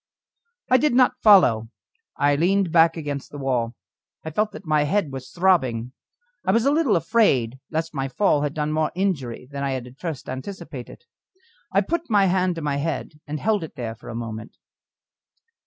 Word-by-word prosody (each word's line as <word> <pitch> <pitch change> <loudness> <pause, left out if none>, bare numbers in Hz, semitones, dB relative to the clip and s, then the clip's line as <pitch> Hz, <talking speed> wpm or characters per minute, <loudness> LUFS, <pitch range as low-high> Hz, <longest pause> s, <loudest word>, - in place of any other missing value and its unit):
I 255 - +7
did 290 -2 +2
not 255 0 +3
follow, 125 - +6 0.5
I 145 0 +3
leaned 180 +3 +2
back 165 0 +5
against 145 -3 -5
the 145 - -9
wall. 125 -4 -1 0.5
I 160 - -4
felt 210 +6 0
that 195 - -10
my 155 -2 +2
head 165 -1 0
was 130 -1 -7
throbbing. 130 -10 +1 0.5
I - - +2
was 230 +4 +2
a 280 - +4
little 295 -7 +3
afraid 155 - +2
lest 160 +1 -3
my 135 -2 -2
fall 150 +1 +2
had 145 0 -2
done 150 0 -1
more 155 0 0
injury 140 -11 -2
than 140 0 -4
I 135 -1 -1
had 130 -2 -4
at 125 +3 -14
first 160 -7 -5
anticipated. 135 - -7 0.7
I 195 +1 +3
put 335 - -3
my 205 -3 +4
hand 185 -1 +1
to 165 - -5
my 145 -1 0
head, 150 0 -4
and 150 +1 -4
held 210 -1 +1
it 160 - -9
there 120 -5 -4
for 115 - -13
a 115 - -6
moment. 115 -1 -6
155 Hz, 190 wpm, -23 LUFS, 130-195 Hz, 0.7 s, I